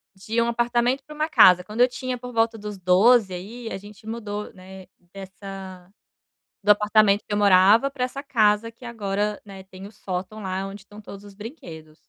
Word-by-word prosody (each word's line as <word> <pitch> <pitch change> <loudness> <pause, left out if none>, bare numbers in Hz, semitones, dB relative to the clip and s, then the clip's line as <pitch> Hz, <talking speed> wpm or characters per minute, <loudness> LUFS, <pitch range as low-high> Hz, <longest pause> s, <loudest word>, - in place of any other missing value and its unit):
De 220 +4 -2
um 235 - +1
apartamento 240 +3 0
para 300 - -11
uma 310 +1 -2
casa, 180 - +6
quando 210 +6 -4
eu 250 - +7
tinha 255 0 -5
por 250 0 -9
volta 225 0 +1
dos 210 -1 -7
12, 190 +3 +4
aí 225 +6 -7
a - - -4
gente 210 +3 -14
mudou, 210 -2 -5
né, 190 0 -13 0.3
dessa 190 -1 -10 0.7
do 210 +1 +4
apartamento 210 0 +3
que - - -5
eu 205 - +1
morava 205 +5 +5
para 265 -2 -4
essa 275 +2 -4
casa 220 -5 +2
que 230 +2 -19
agora, 210 -3 -3
né, 195 -1 -11
tem 190 +1 -12
o - - -14
sótão 195 +1 -6
lá 190 0 -3
onde 195 +1 -10
estão 205 +2 -15
todos 200 0 -11
os 205 - -13
brinquedos. 170 - -11
210 Hz, 195 wpm, -23 LUFS, 195-235 Hz, 0.7 s, eu